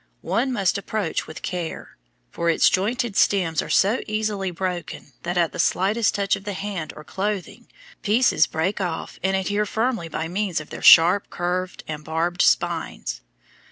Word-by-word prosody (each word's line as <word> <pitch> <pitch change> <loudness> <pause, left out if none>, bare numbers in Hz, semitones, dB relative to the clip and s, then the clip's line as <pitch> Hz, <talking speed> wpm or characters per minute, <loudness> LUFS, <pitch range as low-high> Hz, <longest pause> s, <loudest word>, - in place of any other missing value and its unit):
One 260 +3 0
must 200 -4 +1
approach 200 -3 -3
with 155 - -9
care, 175 -3 -5 0.4
for 170 0 -1
its 165 - +4
jointed 225 +3 0
stems 180 -7 +2
are - - -7
so 210 +6 +3
easily 215 -3 -1
broken 175 -5 -5
that 175 +1 -3
at 170 -2 +2
the - - -8
slightest 200 +6 +2
touch 200 -1 +1
of 195 - -10
the 205 0 -4
hand 195 -4 -4
or 150 - -10
clothing, 195 +3 -4 0.3
pieces 235 +4 +3
break 185 +6 -1
off 175 -3 -4
and 190 +1 +1
adhere 205 +2 -1
firmly 220 -5 -1
by 160 0 -3
means 185 -1 -1
of 155 - -11
their - - -7
sharp 175 +5 +7
curved 180 +1 -3
and 150 -1 -5
barbed 165 +3 -1
spines. - - 0
190 Hz, 165 wpm, -23 LUFS, 170-205 Hz, 0.4 s, sharp